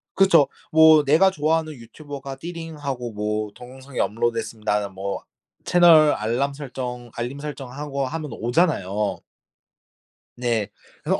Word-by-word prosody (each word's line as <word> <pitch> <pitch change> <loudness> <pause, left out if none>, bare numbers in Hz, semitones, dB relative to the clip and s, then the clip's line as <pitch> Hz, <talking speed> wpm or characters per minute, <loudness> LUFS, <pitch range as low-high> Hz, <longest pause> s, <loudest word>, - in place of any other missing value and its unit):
그쵸. 170 -7 +5 0.2
뭐 160 -1 +7
내가 155 +7 +5
좋아하는 155 -1 0
유튜버가 135 +2 -9
띠링하고 150 -7 -6
뭐 105 0 -2
"동영상이 130 +2 -10
업로드 115 +2 0
됐습니다."는 105 -3 -2
뭐 100 +1 -4 0.4
채널 165 -4 +6
알람 120 +6 -1
설정 125 -4 -6
알림 120 +4 -4
설정하고 140 -1 -5
하면 155 -1 -5
오잖아요. 110 - 0 1.2
네. 115 -4 0 0.3
그래서 - - 0
135 Hz, 285 characters per minute, -23 LUFS, 115-155 Hz, 1.2 s, 뭐